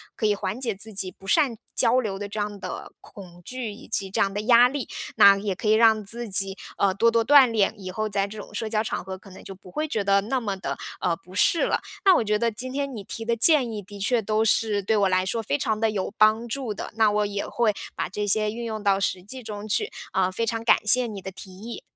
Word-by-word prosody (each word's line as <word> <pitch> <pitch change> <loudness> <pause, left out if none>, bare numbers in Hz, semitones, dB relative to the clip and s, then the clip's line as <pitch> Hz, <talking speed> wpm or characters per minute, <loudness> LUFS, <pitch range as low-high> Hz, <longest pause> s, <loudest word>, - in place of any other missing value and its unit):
可 220 - -2
以 210 -1 +3
缓 200 +3 -4
解 235 -5 -1
自 210 +3 -8
己 190 -1 -2
不 195 - -19
善 270 -2 +2 0.2
交 245 +3 +3
流 210 -6 -3
的 205 - -4
这 210 +1 -6
样 205 -1 -3
的 - - -7
恐 175 -3 -13
惧 250 +1 -4
以 205 - -12
及 195 -1 -2
这 190 - -3
样 195 0 +2
的 205 - -2
压 235 +2 +6
力。 265 -1 -4 0.3
那 200 0 +7
也 200 -1 -3
可 210 - -5
以 215 - +5
让 220 -1 +4
自 230 +3 -5
己， 195 0 0 0.2
呃， 195 -1 +2
多 230 +4 +3
多 230 0 +2
锻 275 -1 +7
炼， 215 -4 +1
以 185 -2 -7
后 215 +3 -3
在 200 -1 0
这 210 +2 -10
种 - - -10
社 225 - -3
交 215 0 0
场 - - -3
合 190 +1 -7
可 195 +1 -16
能 185 - -13
就 195 - -8
不 185 0 -16
会 305 +10 -2
觉 220 -8 -2
得 200 0 +3
那 255 +6 -1
么 200 -4 -3
的， 190 - -4 0.2
呃， 175 -2 +1
不 180 +2 -18
适 335 - +4
了。 - - 0 0.3
那 380 -2 +7
我 - - +2
觉 210 0 +1
得 230 +1 +1
今 255 +4 -6
天 280 0 -3
你 215 -4 -7
提 225 - -7
的 235 0 +1
建 260 -1 +4
议 215 -2 -5
的 205 +1 -12
确 230 +4 +1
都 215 +1 0
是 220 -2 +2
对 210 +3 0
我 200 -2 +3
来 185 0 +1
说 225 +4 -1
非 145 -8 0
常 215 +7 -1
地 225 0 +2
有 195 -2 -3
帮 215 +2 +4
助 245 -2 -3
的， - - -7
那 220 -2 +3
我 210 0 +1
也 200 0 -3
会 230 -3 +1 0.2
把 - - -3
这 205 +3 -3
些 210 +1 +2
运 235 +2 -6
用 220 -2 -5
到 195 -1 +3
实 190 -2 -1
际 255 +6 -9
中 210 -1 -7
去， 415 - 0 0.2
呃， 185 -1 +1
非 230 +5 -2
常 225 0 -2
感 230 - +3
谢 245 +3 +5
你 205 -3 -7
的 190 - -7
提 190 0 -11
议。 215 +6 -8
215 Hz, 290 characters per minute, -24 LUFS, 195-230 Hz, 0.3 s, 那